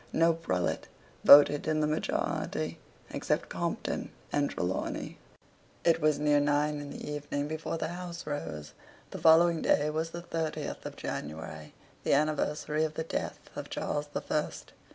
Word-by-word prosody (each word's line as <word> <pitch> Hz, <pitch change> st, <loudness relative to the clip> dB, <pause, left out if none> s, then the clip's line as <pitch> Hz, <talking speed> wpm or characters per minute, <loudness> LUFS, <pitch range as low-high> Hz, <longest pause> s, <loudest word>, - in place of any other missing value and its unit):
No 165 Hz, +1 st, +4 dB
prelate 95 Hz, -, -1 dB, 0.4 s
voted 145 Hz, +1 st, +8 dB
in 155 Hz, -1 st, +2 dB
the 155 Hz, -, +2 dB
majority 85 Hz, -, -1 dB, 0.3 s
except -, -, -1 dB
Compton -, -, -2 dB, 0.2 s
and 145 Hz, -1 st, +2 dB
Trelawney. 90 Hz, +1 st, -3 dB, 0.6 s
It 165 Hz, -1 st, +3 dB
was 155 Hz, -1 st, +3 dB
near 145 Hz, 0 st, +3 dB
nine 145 Hz, +1 st, +1 dB
in 145 Hz, -1 st, -7 dB
the -, -, -7 dB
evening 145 Hz, -1 st, -3 dB
before 160 Hz, +1 st, -3 dB
the -, -, -2 dB
House 175 Hz, 0 st, -6 dB
rose. 75 Hz, -, -5 dB, 0.4 s
The -, -, -6 dB
following 165 Hz, +1 st, +6 dB
day 150 Hz, +1 st, +3 dB
was 160 Hz, +2 st, -1 dB
the 170 Hz, +1 st, -7 dB
thirtieth 160 Hz, -2 st, -3 dB
of -, -, -8 dB
January, 75 Hz, 0 st, -6 dB, 0.3 s
the -, -, +2 dB
anniversary 150 Hz, +1 st, +1 dB
of 155 Hz, -1 st, -2 dB
the 160 Hz, -, -2 dB
death 165 Hz, -, -3 dB, 0.2 s
of -, -, -6 dB
Charles 145 Hz, 0 st, -2 dB
the 145 Hz, -, -4 dB
First. 150 Hz, -, -3 dB
150 Hz, 155 wpm, -30 LUFS, 145-160 Hz, 0.6 s, voted